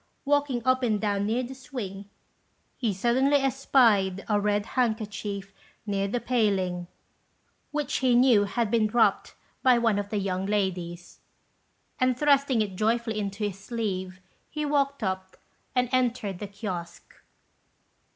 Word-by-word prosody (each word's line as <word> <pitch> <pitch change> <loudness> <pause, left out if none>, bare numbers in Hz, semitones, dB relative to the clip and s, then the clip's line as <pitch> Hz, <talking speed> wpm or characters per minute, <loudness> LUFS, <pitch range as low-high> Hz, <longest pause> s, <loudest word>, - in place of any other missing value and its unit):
Walking 285 -4 +1
up 255 0 +3
and 220 -4 +1
down 200 -1 0
near 235 +4 0
the 255 +2 -6
swing, 230 -7 -7 0.7
he 230 -5 -1
suddenly 245 +8 +2
espied 235 -8 +2
a 210 -1 +2
red 205 0 +1
handkerchief 210 -5 -2 0.3
near 200 -2 -1
the 240 +5 -1
paling, 195 -8 0 0.8
which 295 -2 -2
he 255 -2 +3
knew 240 -5 +5
had 215 +1 -1
been 225 -2 +3
dropped 230 +2 +2 0.3
by 255 -2 +5
one 225 -3 +2
of 205 0 -4
the 210 - -2
young 190 -1 -2
ladies; 180 -4 -2 0.8
and, 255 -2 +2
thrusting 280 -5 +3
it 195 -3 -6
joyfully 225 +1 0
into 200 +1 -4
his 200 -2 -3
sleeve, 195 -4 -4 0.3
he 300 0 -3
walked 280 -3 0
up 190 -1 -3 0.4
and 250 0 +2
entered 245 -7 0
the 205 - -5
kiosque. 190 -4 -7
215 Hz, 140 wpm, -27 LUFS, 195-250 Hz, 0.8 s, knew